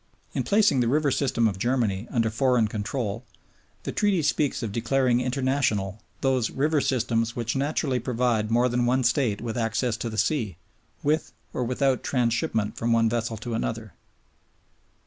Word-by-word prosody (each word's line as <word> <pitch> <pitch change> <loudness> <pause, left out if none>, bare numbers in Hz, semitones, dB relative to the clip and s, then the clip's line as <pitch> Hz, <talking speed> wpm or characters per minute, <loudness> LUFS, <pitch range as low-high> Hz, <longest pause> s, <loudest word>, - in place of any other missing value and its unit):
In - - 0
placing 205 -9 +3
the 120 - +2
river 145 +3 +2
system 120 -4 +1
of 95 -3 -3
Germany 115 -3 0
under 115 -4 +1
foreign 125 -1 +2
control, 105 +1 -3 0.6
the - - -3
Treaty 200 -6 +1
speaks 145 -4 0
of 110 - -3
declaring 125 +2 +1
international 125 -6 0 0.2
those 130 -4 +1
"river 150 +2 +1
systems 115 -3 0
which 120 0 -2
naturally 135 -2 0
provide 120 -3 0
more 120 +2 +3
than 120 0 +1
one 130 +1 +2
State 120 -4 +1
with 115 0 -3
access 115 +1 0
to 115 - -3
the 110 - -6
sea, 110 - 0 0.5
with 155 +2 0 0.2
or 125 - -1
without 130 +1 +1
transhipment 115 -4 0
from 115 +1 0
one 115 -1 +4
vessel 115 -1 -2
to 115 +2 -5
another." 110 -3 -3
120 Hz, 160 wpm, -26 LUFS, 115-130 Hz, 0.6 s, one